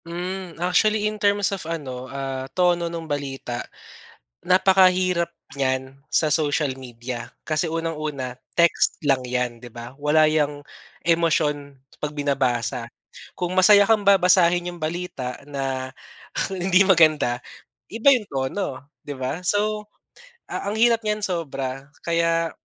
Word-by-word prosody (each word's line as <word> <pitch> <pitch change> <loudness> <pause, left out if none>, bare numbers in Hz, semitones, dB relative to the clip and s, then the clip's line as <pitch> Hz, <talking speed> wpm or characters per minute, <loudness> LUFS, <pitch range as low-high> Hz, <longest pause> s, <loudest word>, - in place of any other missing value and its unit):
Hmm, 180 +1 -5
actually 210 +5 +2
in 215 0 -2
terms 205 -1 +2
of 195 - -4
ano, 130 -6 -5
ah, 135 -1 -5
tono 175 -1 +2
nung 165 -1 -6
balita, 135 -5 -4 0.8
napakahirap 185 -1 +3 0.3
niyan 130 0 -1
sa 155 -2 +1
social 145 -3 +1
media. 120 -1 -7 0.2
Kasi 155 +2 0
unang 165 -1 -3
una 130 -5 -4 0.2
text 170 -1 +3
lang 135 -3 +3
yan, 125 -1 -2
di 120 - -10
ba, 120 +1 -9
wala 155 +1 +4
yang 145 -2 0 0.4
emosyon 155 -4 +1 0.2
pag 150 0 -4
binabasa. 130 -4 -1 0.5
Kung 180 -1 -3
masaya 205 +2 +7
kang 205 -1 +2
babasahin 180 -2 +4
yung - - -13
balita 155 -6 -4
na, 135 -2 -4 0.6
hindi 185 +1 +3
maganda 155 -9 +4 0.5
iba 230 +5 +4
yung 240 -6 +1
tono, 140 +1 -4
di 145 - -5
ba? 130 +5 -3
So, 210 +2 0 0.6
ang 200 +1 -3
hirap 230 0 +4
niyan 210 0 -1
sobra 140 -6 -4
kaya, 165 -1 +1
160 Hz, 125 wpm, -23 LUFS, 135-185 Hz, 0.8 s, masaya